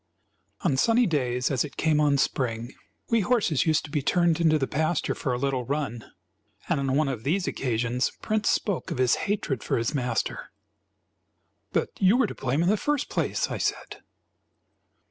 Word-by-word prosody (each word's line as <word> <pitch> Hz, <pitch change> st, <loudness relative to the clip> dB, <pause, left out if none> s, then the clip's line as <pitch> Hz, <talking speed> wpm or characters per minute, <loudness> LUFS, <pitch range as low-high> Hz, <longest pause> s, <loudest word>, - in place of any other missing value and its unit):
On 155 Hz, -10 st, +1 dB
sunny 230 Hz, -, +4 dB
days, 125 Hz, -, 0 dB
as 130 Hz, -3 st, +1 dB
it 150 Hz, -, -9 dB
came 155 Hz, -2 st, +2 dB
on 145 Hz, -2 st, +3 dB
spring, 120 Hz, -3 st, -1 dB, 0.4 s
we 230 Hz, -, +4 dB
horses 200 Hz, -, +1 dB
used 160 Hz, 0 st, +2 dB
to 150 Hz, -, -11 dB
be 145 Hz, -, 0 dB
turned 170 Hz, +2 st, +2 dB
into 155 Hz, -2 st, +4 dB
the 135 Hz, -, 0 dB
pasture 155 Hz, +3 st, 0 dB
for 130 Hz, -, -3 dB
a 125 Hz, -, 0 dB
little 135 Hz, -1 st, -1 dB
run; 125 Hz, -3 st, -3 dB, 0.6 s
and 165 Hz, -5 st, +1 dB
on 135 Hz, -1 st, 0 dB
one 155 Hz, 0 st, +2 dB
of 125 Hz, -5 st, -4 dB
these 175 Hz, +7 st, 0 dB
occasions 120 Hz, 0 st, -1 dB
Prince 215 Hz, -1 st, 0 dB
spoke 200 Hz, -5 st, -1 dB
of -, -, -3 dB
his 125 Hz, -1 st, +3 dB, 0.2 s
hatred 160 Hz, -, -1 dB
for -, -, 0 dB
his 115 Hz, 0 st, -1 dB
master. 125 Hz, -5 st, -2 dB, 1.2 s
"But -, -, 0 dB
you 195 Hz, +5 st, +5 dB
were 260 Hz, -, +4 dB
to -, -, -5 dB
blame 135 Hz, +5 st, -1 dB
in 175 Hz, -, +2 dB
the 210 Hz, -, +3 dB
first 295 Hz, +4 st, -1 dB
place," -, -, -1 dB
I -, -, -3 dB
said. -, -, -3 dB
145 Hz, 185 wpm, -26 LUFS, 125-175 Hz, 1.2 s, you